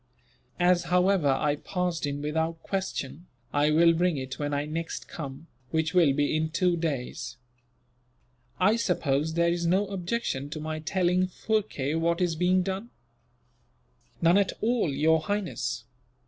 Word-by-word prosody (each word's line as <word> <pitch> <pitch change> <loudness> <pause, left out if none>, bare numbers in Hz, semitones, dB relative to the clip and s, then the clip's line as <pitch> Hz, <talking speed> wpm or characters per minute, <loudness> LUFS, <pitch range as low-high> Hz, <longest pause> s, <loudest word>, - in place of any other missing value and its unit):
As, 175 0 +3
however, 180 -1 +3
I 145 +2 +1
passed 180 -2 -2
in 145 0 -4
without 160 +2 -2
question, 175 -5 -4 0.3
I 145 +1 +3
will 165 +2 +5
bring 175 -1 +1
it 130 -1 -5
when 145 0 -2
I 145 0 -1
next 165 +2 -4
come, 140 -1 -7 0.2
which 160 +2 0
will 170 -6 +5
be 145 +2 +1
in 155 0 0
two 180 +2 +1
days." 130 -6 -3 1.2
"I 205 +5 +4
suppose 160 -7 0
there 170 0 +3
is 170 -1 -1
no 190 +4 +3
objection 185 - -3
to 155 +1 -5
my 155 0 -4
telling 180 +3 +1
Phurkay 190 -8 -1
what 165 +1 +1
is 175 -3 +1
being 180 +2 +2
done?" 195 +5 -4 1.3
"None 170 +4 +6
at 200 - +1
all, 230 -5 +1
Your 160 +4 +3
Highness. 155 - -2
165 Hz, 145 wpm, -27 LUFS, 150-180 Hz, 1.3 s, None